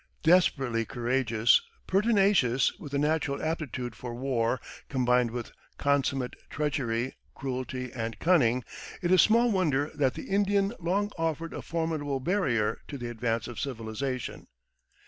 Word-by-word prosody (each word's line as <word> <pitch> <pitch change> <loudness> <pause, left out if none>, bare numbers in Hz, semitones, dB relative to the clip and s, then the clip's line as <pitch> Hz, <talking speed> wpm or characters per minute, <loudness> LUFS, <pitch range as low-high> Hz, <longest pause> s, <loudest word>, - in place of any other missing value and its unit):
Desperately 135 -9 +3
courageous, 120 -1 +2 0.2
pertinacious, 195 - +3
with 145 - -8
a - - +2
natural 150 -1 +1
aptitude 140 -7 -3
for 120 +1 -7
war 125 -1 0 0.3
combined 125 -3 +2
with 120 0 -5 0.3
consummate 140 -2 +1 0.2
treachery, 130 -5 -1 0.2
cruelty, 130 -1 -4
and 115 -2 -4
cunning, 130 -9 +3 0.4
it 175 - +1
is 185 - +7
small 235 +2 +4
wonder 150 -7 +1
that 135 -3 +1
the - - -6
Indian 200 +1 +2
long 195 +4 0
offered 165 0 -2
a - - -5
formidable 160 -4 -2
barrier 130 - +1
to 145 - -6
the 120 -2 -5
advance 115 -1 -1
of 120 -2 -7
civilization. 130 0 -4
135 Hz, 130 wpm, -28 LUFS, 120-165 Hz, 0.4 s, is